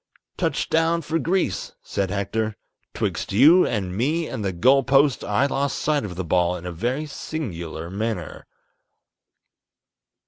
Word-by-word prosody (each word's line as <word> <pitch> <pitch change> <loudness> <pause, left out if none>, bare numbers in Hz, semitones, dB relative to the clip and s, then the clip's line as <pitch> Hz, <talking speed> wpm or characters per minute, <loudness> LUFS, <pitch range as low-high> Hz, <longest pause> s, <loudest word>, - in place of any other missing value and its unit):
"Touch - - -1
down 165 +1 +2
for 160 +2 -1
Greece," 175 - -1
said 100 -2 -2
Hector; 105 +2 -2 0.4
"'twixt - - -2
you 155 - +6
and 95 -6 -2
me 155 +10 0
and 110 - -5
the 95 - 0
goal 130 +10 +4
post 135 +1 +3
I 105 +6 +1
lost 140 0 -1
sight 150 -3 0
of 95 -4 -6
the 90 0 -4
ball 90 +1 +2
in 90 0 -8
a 90 - -4
very 125 - -2
singular 85 - -5
manner." 100 -4 -4
110 Hz, 145 wpm, -23 LUFS, 95-145 Hz, 0.4 s, you